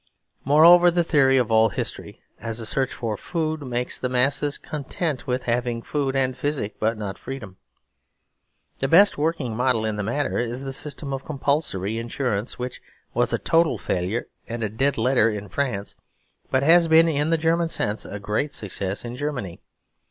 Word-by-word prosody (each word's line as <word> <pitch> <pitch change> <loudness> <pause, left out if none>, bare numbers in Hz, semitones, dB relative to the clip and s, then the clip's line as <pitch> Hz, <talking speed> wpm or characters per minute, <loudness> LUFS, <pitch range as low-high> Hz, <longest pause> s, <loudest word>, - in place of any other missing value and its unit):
Moreover, 170 +5 +7
the 175 0 +1
theory 135 -5 +4
of 120 -3 +1
all 110 0 +5
history 90 - -6 0.2
as 115 0 -4
a 115 - -5
search 130 +3 0
for 115 -3 -3
food 155 - -3
makes 125 -2 -2
the 125 - -2
masses 140 +3 +2
content 150 -1 -4
with 125 0 -1
having 120 -1 -1
food 140 -2 -2
and 130 -1 +1
physic, 130 -5 -2
but 110 +1 0
not 100 -2 -5
freedom. 105 -9 -8 1.2
The 135 - 0
best 180 +4 +5
working 150 -7 -1
model 125 -2 +1
in 110 -1 -2
the - - -1
matter 130 +8 -1
is 120 +2 -2
the 135 -1 -3
system 145 0 -4
of 135 0 -4
Compulsory 135 - -1
Insurance; 115 -2 -2
which 125 0 -6 0.3
was - - +1
a - - +1
total 165 -6 +2
failure 95 +5 -2 0.2
and 110 -2 -4
dead 140 +3 +1
letter 115 -1 +3
in 105 -2 -5
France 110 -7 -3 0.5
but 130 +1 +1
has 165 +3 +6
been, 165 +1 +6
in 150 -1 0
the 165 - +3
German 165 +1 +1
sense, 105 -8 -1
a 105 - -7
great 105 +8 -2
success 100 0 -3
in 120 +1 -6
Germany. 125 - -4
130 Hz, 175 wpm, -23 LUFS, 110-145 Hz, 1.2 s, Moreover